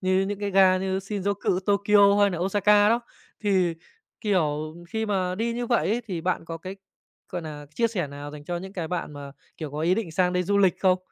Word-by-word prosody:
như 185 0 +2
những 205 -1 -3
cái 205 -1 -2
ga 190 -1 +5
như 190 0 -1
Shinjuku, 195 -1 -1
Tokyo 200 0 +4
hay 200 0 +5
nà 175 - -3
Osaka 205 +3 +4
đó. 230 +2 +3 0.4
Thì, 185 -5 +2 0.5
kiểu, 155 -6 0
khi 220 +4 -2
mà 185 -3 0
đi 230 +4 -1
như 240 +1 -3
vậy 235 0 +1
ấy 225 +4 +1
thì 180 -6 -3
bạn 180 0 -1
có 165 0 -6
cái, 185 +4 -8 0.5
gọi 175 - -4
nà, 150 -2 -8
chia 230 - +2
sẻ 190 -8 -2
nào 145 +1 -8
dành 145 0 -10
cho 175 +3 -3
những 190 +2 -7
cái 170 -4 -4
bạn 175 -3 -3
mà, 140 -1 -9 0.2
kiểu, 155 -3 -6
có 150 +2 -5
ý 170 +3 +3
định 190 -6 -3
sang 180 +1 +2
đây 180 0 +1
du 200 +3 +1
lịch 190 -3 +3
không? 185 -1 +4
185 Hz, 230 wpm, -25 LUFS, 170-205 Hz, 0.5 s, ga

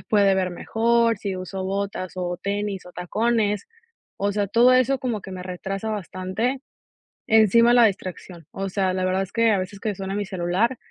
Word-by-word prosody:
se - - -17
puede 200 -2 +4
ver 185 -1 0
mejor, 230 +4 +1
si 195 -2 -3
uso 185 +1 -5
botas 195 -1 -3
o 175 -1 -3
tenis 200 -1 -3
o 180 - -12
tacones, 210 +4 0 0.5
o 200 +1 0
sea, 205 0 0
todo 235 +5 +5
eso 255 +2 +3
como 240 -4 -2
que - - -9
me 185 -1 -6
retrasa 190 +4 -4
bastante, 210 +6 -3 0.7
encima 230 +1 +5
la 240 -1 +7
distracción, 185 -4 -4
o 195 0 -4
sea, 190 -1 0
la 185 0 -1
verdad 185 +1 +1
es 195 - -9
que 230 -1 +3
a 205 - +3
veces 185 +2 -6
que 210 -2 -2
suena 195 0 -5
mi 205 - -2
celular, 190 +6 0
200 Hz, 195 wpm, -23 LUFS, 185-225 Hz, 0.7 s, la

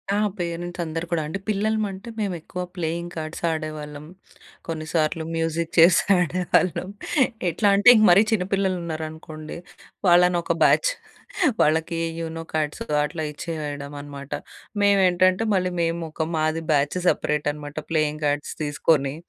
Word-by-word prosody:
ఆ! - - +1 0.2
పేరెంట్సందరూ 170 -1 -3
కూడా 170 - +1
అండి. 160 +6 -4
పిల్లలమంటే 215 0 -1
మేమెక్కువ 180 -3 -4
ప్లేయింగ్ 170 0 -3
కార్డ్స్ 155 +1 -6
ఆడేవాళ్ళం. 155 -2 -5 0.6
కొన్నిసార్లు 160 0 -1
మ్యూజిక్ 165 0 -2
చైర్స్ 170 +1 +7 0.2
ఆడేవాళ్ళం. 180 +1 +1 0.6
ఎట్లా 205 +5 +2
అంటే 200 - +1
ఇంక 215 - +5
మరీ 195 +4 +7
చిన్నపిల్లలున్నారనుకోండి 170 -6 -3 0.5
వాళ్ళనొక 175 -1 +4
బ్యాచ్. - - +4 0.7
వాళ్ళకి 160 +2 +1 0.2
యూనో 165 0 -5
కార్డ్స్ 155 -1 -1 0.2
అట్లా 155 +1 -3
ఇచ్చేయడమనమాట. 145 -3 -6 0.5
మేమేంటంటే 185 -1 +4
మళ్ళీ 185 -1 +1
మేమొక 165 -1 -2
మాది 155 +1 0
బ్యాచ్ 145 +2 +1
సెపరేటనమాట 145 -1 -1
ప్లేయింగ్ 155 -1 0
కార్డ్స్ 145 0 -1
తీసుకొని 145 -1 +1
165 Hz, 105 wpm, -24 LUFS, 155-180 Hz, 0.7 s, చైర్స్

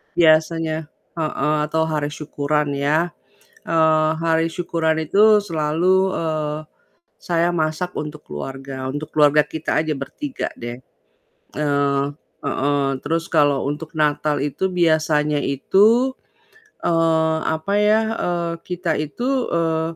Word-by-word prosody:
Biasanya 160 -1 +2 0.3
heeh, 155 -1 0
atau 160 +1 +1
hari 155 -2 -1
syukuran 150 0 -2
ya, 150 +5 +1 0.6
eee, 160 -1 +3
hari 165 0 +1
syukuran 165 -2 -1
itu 210 +5 +5
selalu, 180 +3 +1
eee, 155 -2 -2 0.6
saya 170 0 0
masak 165 +1 -1
untuk 150 0 -5
keluarga 135 - -6
untuk 145 +1 -5
keluarga 150 0 +5
kita 160 0 -2
aja 155 -2 -2
bertiga 285 - -5
deh. 120 +2 -7 0.7
Eee 140 -1 +1 0.4
heeh, 140 0 0 0.2
terus 165 +2 -1
kalau 145 -4 +3
untuk 155 +3 -6
Natal 150 -1 +1
itu 145 +7 -1
biasanya 155 -3 +2
itu, 210 - +3 0.7
eee, 160 -1 +2
apa 160 +5 -2
ya, 210 +1 +4 0.2
eee, 170 -1 -1 0.2
kita 180 -2 -1
itu, 155 - -3 0.2
eee, 160 -1 0
155 Hz, 115 wpm, -21 LUFS, 150-170 Hz, 0.7 s, itu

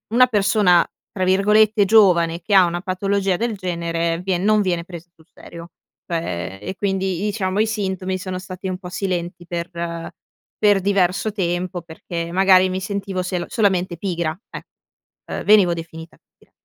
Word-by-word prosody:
una 255 +1 +7
persona 200 -5 +3 0.3
tra 185 - -3
virgolette, 210 +2 +4
"giovane", 175 -5 +4
che 200 +3 0
ha 185 -2 +7
una 175 +1 -3
patologia 195 0 0
del 230 -2 -2
genere 170 -2 -2
vien 185 -1 0
non 215 0 +3
viene 175 -3 -1
pres 175 -2 -10
sul 160 - -24
serio. 170 0 -12 0.4
Cioè 95 - -3
e 190 - -5
quindi 195 -1 -1
diciamo 200 -1 -1
i 220 - +3
sintomi 190 -3 -2
sono 185 0 -5
stati 185 0 -7
un 185 0 -4
po' 180 -2 -8
silenti 175 -2 -4
per 170 0 -4 0.9
per 205 -2 +3
diverso 195 +1 +1
tempo, 180 -2 -2
perché 170 0 -6
magari 185 0 +5
mi 185 +1 -2
sentivo 195 -1 -3
selo 180 -1 -3
solamente 185 -5 0
pigra 170 -4 -2
eh, - - -8 0.7
ehm - - -4
venivo 200 -5 +5
definita 165 0 -9 0.2
pigra. - - -26
185 Hz, 160 wpm, -21 LUFS, 175-200 Hz, 0.9 s, una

